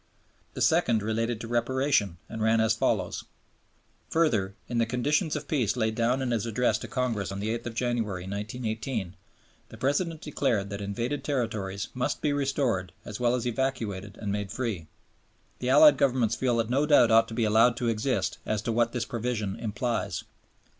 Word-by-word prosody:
The -, -, 0 dB
second 110 Hz, -3 st, +3 dB
related 115 Hz, +1 st, -1 dB
to 115 Hz, -, -6 dB
Reparation 120 Hz, -, +1 dB
and 110 Hz, -, -6 dB
ran 110 Hz, +1 st, +3 dB
as 110 Hz, 0 st, +3 dB
follows: 115 Hz, -, 0 dB, 0.9 s
"Further, 110 Hz, -13 st, +1 dB
in 120 Hz, -, -1 dB
the 115 Hz, -, +2 dB
conditions 145 Hz, -, +1 dB
of 150 Hz, -1 st, -5 dB
peace 125 Hz, -7 st, 0 dB
laid 110 Hz, -2 st, +1 dB
down 120 Hz, +4 st, +1 dB
in 125 Hz, -, -1 dB
his 115 Hz, -1 st, 0 dB
Address 120 Hz, +2 st, +1 dB
to -, -, -7 dB
Congress 115 Hz, -7 st, -1 dB
on 100 Hz, -, -4 dB
the 110 Hz, +3 st, -1 dB
8th 120 Hz, 0 st, -5 dB
January, 115 Hz, -7 st, -1 dB
1918 110 Hz, 0 st, -4 dB, 0.5 s
the -, -, -11 dB
President 160 Hz, +4 st, 0 dB
declared 115 Hz, -10 st, -1 dB
that 100 Hz, 0 st, -4 dB
invaded 115 Hz, +8 st, -3 dB
territories 110 Hz, -8 st, -2 dB
must 125 Hz, -, -1 dB
be 145 Hz, -, 0 dB
restored 135 Hz, -9 st, 0 dB
as 105 Hz, +2 st, -6 dB
well 120 Hz, 0 st, +2 dB
as 125 Hz, -1 st, -3 dB
evacuated 110 Hz, -6 st, -2 dB
and 105 Hz, -2 st, -3 dB
made 100 Hz, -1 st, -3 dB
free. 110 Hz, -11 st, -3 dB, 0.7 s
The 125 Hz, -, -2 dB
Allied 145 Hz, +1 st, +8 dB
Governments 125 Hz, -5 st, +2 dB
feel 125 Hz, -3 st, +1 dB
that 115 Hz, 0 st, 0 dB
no 140 Hz, +4 st, +2 dB
doubt 125 Hz, -6 st, +6 dB
ought 115 Hz, 0 st, +6 dB
to 115 Hz, -, -7 dB
be 115 Hz, -, +1 dB
allowed 115 Hz, +2 st, +4 dB
to 120 Hz, -, -1 dB
exist 115 Hz, +4 st, 0 dB
as 110 Hz, 0 st, -2 dB
to 115 Hz, -, -1 dB
what 115 Hz, 0 st, +1 dB
this 120 Hz, -2 st, -1 dB
provision 115 Hz, -4 st, -2 dB
implies. 110 Hz, -3 st, -2 dB
115 Hz, 180 wpm, -28 LUFS, 105-125 Hz, 0.9 s, Allied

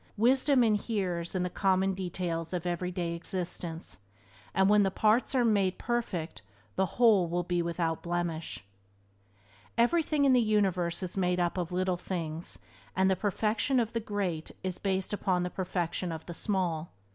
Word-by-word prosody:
Wisdom 260 Hz, +3 st, +4 dB
inheres 200 Hz, -6 st, 0 dB
in 180 Hz, -, +1 dB
the 180 Hz, -, -1 dB
common 190 Hz, 0 st, +2 dB
details 175 Hz, -2 st, -3 dB
of 180 Hz, -1 st, -2 dB
everyday 175 Hz, 0 st, -2 dB
existence, 170 Hz, -, -5 dB, 0.5 s
and 190 Hz, 0 st, +3 dB
when 210 Hz, +1 st, +5 dB
the 195 Hz, -, +3 dB
parts 220 Hz, +7 st, +2 dB
are 245 Hz, -2 st, +4 dB
made 200 Hz, -4 st, +2 dB
perfect 220 Hz, -9 st, -2 dB, 0.3 s
the 190 Hz, 0 st, +2 dB
Whole 220 Hz, -7 st, +5 dB
will 175 Hz, +1 st, -1 dB
be 175 Hz, 0 st, 0 dB
without 170 Hz, -1 st, -1 dB
blemish. 170 Hz, -, -3 dB, 1.1 s
Everything 295 Hz, +4 st, +3 dB
in 270 Hz, -, +5 dB
the 250 Hz, -, +5 dB
universe 190 Hz, -5 st, +1 dB
is 185 Hz, +1 st, -4 dB
made 180 Hz, -1 st, +1 dB
up 175 Hz, -1 st, +1 dB
of 180 Hz, -2 st, -2 dB
little 185 Hz, 0 st, 0 dB
things, 170 Hz, -3 st, -5 dB, 0.4 s
and 190 Hz, 0 st, +3 dB
the -, -, +3 dB
perfection 215 Hz, +6 st, +1 dB
of 230 Hz, 0 st, -1 dB
the 230 Hz, -, 0 dB
great 195 Hz, -7 st, -3 dB
is 185 Hz, -1 st, -3 dB
based 190 Hz, 0 st, -1 dB
upon 185 Hz, -3 st, +1 dB
the 180 Hz, -, -3 dB
perfection 180 Hz, -1 st, -2 dB
of 160 Hz, -1 st, -6 dB
the 175 Hz, -, -6 dB
small. 175 Hz, -4 st, -1 dB
185 Hz, 160 wpm, -30 LUFS, 175-210 Hz, 1.1 s, when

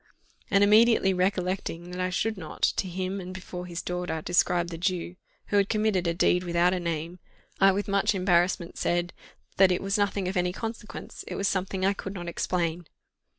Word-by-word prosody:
And 200 Hz, 0 st, +4 dB
immediately 215 Hz, -1 st, +5 dB
recollecting 180 Hz, -2 st, -1 dB
that 180 Hz, 0 st, -4 dB
I 185 Hz, -, 0 dB
should 220 Hz, +4 st, -1 dB
not, 165 Hz, -5 st, -9 dB
to 190 Hz, -, 0 dB
him, 185 Hz, +2 st, -3 dB
and 185 Hz, +1 st, -8 dB
before 180 Hz, -1 st, -7 dB
his 170 Hz, 0 st, -5 dB
daughter, 180 Hz, -2 st, -3 dB
describe 175 Hz, +1 st, +1 dB
the 165 Hz, -, -6 dB
Jew, 180 Hz, -1 st, -1 dB, 0.3 s
who 205 Hz, -, +2 dB
had 200 Hz, 0 st, +3 dB
committed 215 Hz, -5 st, +1 dB
a 170 Hz, -, +1 dB
deed 180 Hz, +1 st, +3 dB
without 175 Hz, +1 st, +2 dB
a 185 Hz, -, -1 dB
name, 170 Hz, +1 st, -4 dB, 0.4 s
I 195 Hz, 0 st, +6 dB
with 200 Hz, +2 st, -2 dB
much 200 Hz, +1 st, +2 dB
embarrassment 180 Hz, -1 st, +1 dB
said, 175 Hz, 0 st, 0 dB, 0.4 s
that 190 Hz, -1 st, +6 dB
"it 180 Hz, -, +1 dB
was 195 Hz, +2 st, -1 dB
nothing 200 Hz, -2 st, 0 dB
of 190 Hz, -, -3 dB
any 180 Hz, 0 st, +1 dB
consequence 225 Hz, 0 st, -7 dB
it -, -, -5 dB
was 200 Hz, -, 0 dB
something 190 Hz, 0 st, -1 dB
I 195 Hz, -, +3 dB
could 195 Hz, 0 st, -7 dB
not 175 Hz, -2 st, -6 dB
explain." 170 Hz, -1 st, -2 dB
185 Hz, 195 wpm, -27 LUFS, 175-195 Hz, 0.4 s, I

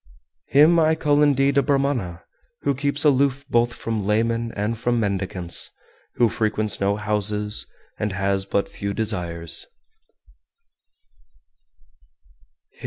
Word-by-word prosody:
404. 140 Hz, -, +3 dB
Him 170 Hz, +2 st, +5 dB
I 160 Hz, 0 st, +3 dB
call 145 Hz, -2 st, +2 dB
indeed 140 Hz, -1 st, +3 dB
a -, -, +4 dB
Brahmana 135 Hz, -, -1 dB, 0.4 s
who 140 Hz, -, +1 dB
keeps 140 Hz, +2 st, 0 dB
aloof 140 Hz, -1 st, +2 dB
both 120 Hz, -2 st, +2 dB
from 110 Hz, -2 st, -3 dB
laymen 115 Hz, +3 st, 0 dB
and 105 Hz, +3 st, -2 dB
from 120 Hz, +1 st, -1 dB
mendicants, 95 Hz, -4 st, -1 dB, 0.5 s
who 120 Hz, -, +4 dB
frequents 110 Hz, -1 st, -1 dB
no 100 Hz, +1 st, +2 dB
houses, 105 Hz, 0 st, 0 dB, 0.3 s
and 105 Hz, -1 st, -1 dB
has 95 Hz, 0 st, -1 dB
but 100 Hz, -, 0 dB
few 100 Hz, -1 st, -5 dB
desires. 85 Hz, -6 st, 0 dB
110 Hz, 115 wpm, -22 LUFS, 100-140 Hz, 0.5 s, Him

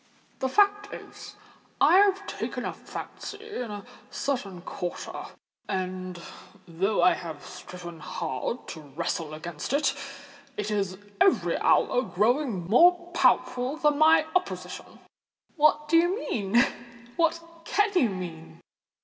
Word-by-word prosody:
"The 265 Hz, -, 0 dB
fact 410 Hz, +4 st, +3 dB
is -, -, -10 dB, 0.4 s
I 365 Hz, -, +6 dB
have 400 Hz, 0 st, +3 dB
taken -, -, -4 dB
a -, -, -2 dB
fancy 420 Hz, +1 st, -8 dB
in 240 Hz, -, -4 dB
a 205 Hz, 0 st, -7 dB, 0.2 s
certain 200 Hz, -10 st, -3 dB
quarter—and, 185 Hz, +1 st, -6 dB, 0.5 s
though 190 Hz, +5 st, +1 dB
I -, -, +6 dB
have 160 Hz, -4 st, -7 dB
striven 175 Hz, -2 st, -9 dB
hard 150 Hz, -, -4 dB
to 160 Hz, -, -7 dB
wrestle 155 Hz, +1 st, -4 dB
against 160 Hz, -, -5 dB
it, 280 Hz, -2 st, +2 dB, 0.6 s
it 210 Hz, 0 st, -2 dB
is 195 Hz, -3 st, -1 dB, 0.2 s
every 390 Hz, -, +4 dB
hour 250 Hz, -, +3 dB
growing 235 Hz, -, +1 dB
more 350 Hz, -, +5 dB
powerful 255 Hz, +4 st, +2 dB
than 295 Hz, -1 st, +2 dB
my 315 Hz, 0 st, +6 dB
opposition." 365 Hz, +2 st, -3 dB, 0.5 s
"What 300 Hz, -1 st, +3 dB
do 330 Hz, +2 st, +5 dB
you 345 Hz, +3 st, +3 dB
mean? 215 Hz, -, -3 dB, 0.6 s
what 335 Hz, 0 st, +2 dB, 0.3 s
can 415 Hz, 0 st, +2 dB
you 285 Hz, -, +4 dB
mean?" 175 Hz, -4 st, -7 dB
245 Hz, 125 wpm, -27 LUFS, -, 0.6 s, I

